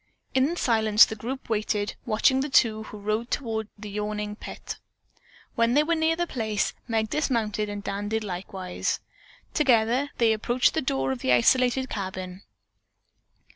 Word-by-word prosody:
In 270 +6 +2
silence 220 -7 +5
the 220 - -6
group 255 +5 -6
waited, 210 -1 -1
watching 240 +4 +3
the 280 +2 -1
two 220 -5 +3
who 210 - -9
rode 215 +3 -2
toward 220 -5 -2
the 210 0 -8
yawning 210 0 -3
pit. - - -8 0.7
When 230 0 +2
they 295 - +5
were 335 +2 +1
near 320 0 +2
the 345 +1 0
place, 220 -9 -1
Meg 220 -2 0
dismounted 220 -8 0
and 205 0 -5
Dan 205 +1 -3
did 220 0 -1
likewise. 185 -1 -3 0.5
Together 250 0 +3
they 230 -2 +4
approached 240 +4 +2
the 320 - 0
door 135 - 0
of 130 - -3
the 130 - 0
isolated 250 - +3
cabin. 185 -3 -5
220 Hz, 155 wpm, -26 LUFS, 205-255 Hz, 0.7 s, silence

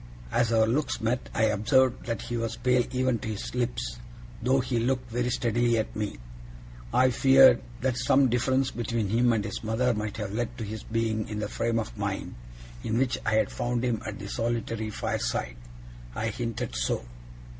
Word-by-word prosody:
As 115 -1 +2
our 110 -1 +4
looks 130 +6 0
met, 115 +3 -1
I 110 - 0
observed 110 +5 +2
that 115 -3 -2
he 120 - -4
was 115 -1 -2
pale 125 0 +2
even 130 -2 +1
to - - -6
his 110 -2 -4
lips, 120 - -2 0.4
though 130 +3 +3
he 125 -2 0
looked 125 +1 -1
very 120 +1 0
steadily 120 -1 +1
at 110 - -2
me. 105 - -3 0.7
I 130 0 +4
feared 135 +2 +7 0.2
that 130 -1 0
some 135 +1 +4
difference 130 +2 +1
between 115 -3 -2
him 120 +3 +3
and 110 -3 0
his 110 - -5
mother 115 +3 +1
might 105 -1 -3
have 105 -2 -4
led 120 +1 -2
to 115 - -4
his 110 0 -5
being 110 -1 -1
in 105 - -4
the 105 - -2
frame 115 0 -1
of 110 - -3
mind - - -3 0.5
in 110 - -1
which 130 -1 +1
I 110 - +3
had 110 -2 +2
found 120 0 -1
him 115 -4 0
at 105 -1 -5
the 100 - -7
solitary 115 0 -2
fireside. 60 - -2 0.6
I 115 - -1
hinted 115 - -4
so. - - -1
115 Hz, 190 wpm, -27 LUFS, 110-125 Hz, 0.7 s, feared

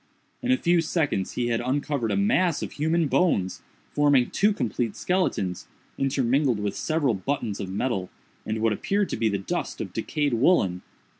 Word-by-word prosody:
In 255 - 0
a 260 - +4
few 175 -6 +3
seconds 155 - -1
he 120 -1 -1
had 115 -1 0
uncovered 140 -1 -1
a - - 0
mass 185 -5 +2
of - - -5
human 160 +2 +1
bones, 115 - +1 0.3
forming 145 -4 +3
two 210 +2 +3
complete 120 - -2
skeletons, 180 - -1 0.3
intermingled 135 -2 +1
with 105 -1 -2
several 155 -6 0
buttons 110 0 -3
of 95 - -4
metal, 95 -2 -2 0.3
and 110 +1 -3
what 115 -1 +3
appeared 200 - 0
to - - -2
be 115 - +1
the 100 - 0
dust 95 - -4
of - - -5
decayed 145 -3 -1
woollen. 115 - +3
135 Hz, 170 wpm, -25 LUFS, 110-165 Hz, 0.3 s, a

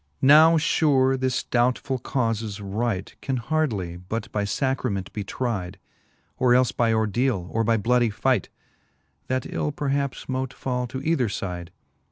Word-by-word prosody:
Now 155 +4 +7
fure 140 -4 +3
this 130 -1 -1
doubtfull 125 +2 0
caufes 115 -5 -2
right 100 0 -3
Can 135 -1 -1
hardly 115 - -1
but 95 +6 -5
by 105 -1 -1
Sacrament 105 -4 -2
be 105 - -3
tride, 100 -4 -3 0.6
Or 125 -1 +4
elfe 125 -2 +2
by 115 -1 +2
ordele, 110 -2 0
or 115 - +1
by 115 +1 +2
blooddy 120 +2 +2
fight; 125 0 0 0.8
That 130 -1 -1
ill 150 - -2
perhaps 140 -1 -2
mote 130 0 -2
fall 125 -1 -2
to 130 +2 -6
either 145 -8 +1
fide. 90 -4 -5
120 Hz, 145 wpm, -24 LUFS, 105-130 Hz, 0.8 s, Now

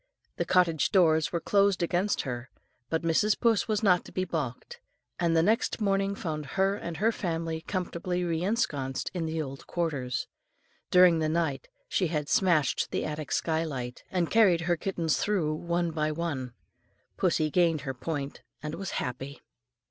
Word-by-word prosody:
The - - 0
cottage 170 -7 +3
doors 160 -6 +4
were 170 - 0
closed 200 -1 +2
against 180 +4 +1
her, 125 -2 -5 0.4
but 160 0 -1
Mrs. 170 +6 +2
Puss 230 -3 +2
was 215 -1 0
not 180 -4 +4
to - - -11
be 185 - -1
balked, 145 -8 -4 0.4
and 170 -1 +2
next 210 +11 +2
morning 195 -1 +1
found 155 -6 -4
her 195 +1 +3
and 170 -4 -6
her 220 +3 +3
family 165 -5 -3
comfortably 180 0 -2
re 165 -2 -1
ensconced 145 - -1
in 170 -3 -2
the 160 0 -2
old 135 -3 -6
quarters: 140 -8 -2 0.6
during 180 -2 +6
the 155 -1 +1
night 155 -4 -1 0.2
she 185 - +1
had 150 -3 -2
smashed 170 -8 +2
the - - -2
attic 155 -1 -5
sky 160 0 +1
light, 125 -6 -5
and 175 -3 -1
carried 195 -7 +5
her 175 +1 +1
kittens 170 -2 -1
through 180 -7 +1
one 170 +1 -1
by 155 -1 0
one. 145 -6 -3 0.6
Pussy 155 -1 +1
gained 165 -3 +3
her 135 -1 -4
point 140 +2 -4 0.2
and 150 0 -4
was 195 +2 -4
happy. 130 +3 -5
165 Hz, 165 wpm, -28 LUFS, 150-185 Hz, 0.6 s, during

